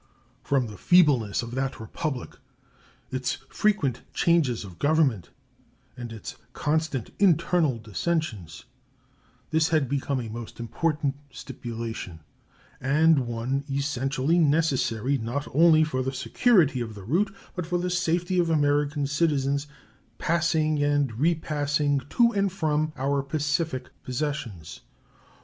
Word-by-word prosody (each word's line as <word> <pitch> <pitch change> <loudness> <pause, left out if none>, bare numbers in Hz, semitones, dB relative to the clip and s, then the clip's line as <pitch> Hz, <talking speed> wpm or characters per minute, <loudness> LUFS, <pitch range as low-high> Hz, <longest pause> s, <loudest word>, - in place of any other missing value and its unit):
From 135 -3 +1
the 105 -4 -9
feebleness 140 - +4
of 120 - -7
that 135 +1 -2
Republic, 125 +4 -4 0.8
its 130 -1 -2
frequent 165 - +1
changes 155 -10 +2
of 90 -3 -12
government, 140 - +2 0.7
and 120 -2 -7
its 110 -3 -8 0.2
constant 150 -5 -1
internal 170 -6 +3
dissensions, 110 - -3 0.9
this 160 0 +3
had 155 -4 +2
become 140 0 -1
a 120 - -5
most 115 +1 -8
important 145 +4 -1
stipulation, 115 -8 -7 0.6
and 145 0 +3
one 120 +4 -2
essentially 140 +3 0
necessary, 140 -5 +1
not 120 +6 -3
only 160 +1 +6
for 130 -4 -1
the 130 +1 -2
security 150 - +2
of 110 -2 -5
the 100 - -10
route, 180 - +1 0.2
but 180 -3 -4
for 175 +1 0
the 180 +1 -2
safety 180 +1 0
of 170 -1 +2
American 145 -1 +1
citizens 140 -1 0 0.5
passing 155 -2 +1
and 145 -5 +1
repassing 150 -2 +1
to 235 -1 +4
and 200 -3 +1
from 155 -4 0
our 140 +1 0
Pacific 145 -1 -2
possessions. 125 - -4
145 Hz, 120 wpm, -26 LUFS, 125-160 Hz, 0.9 s, only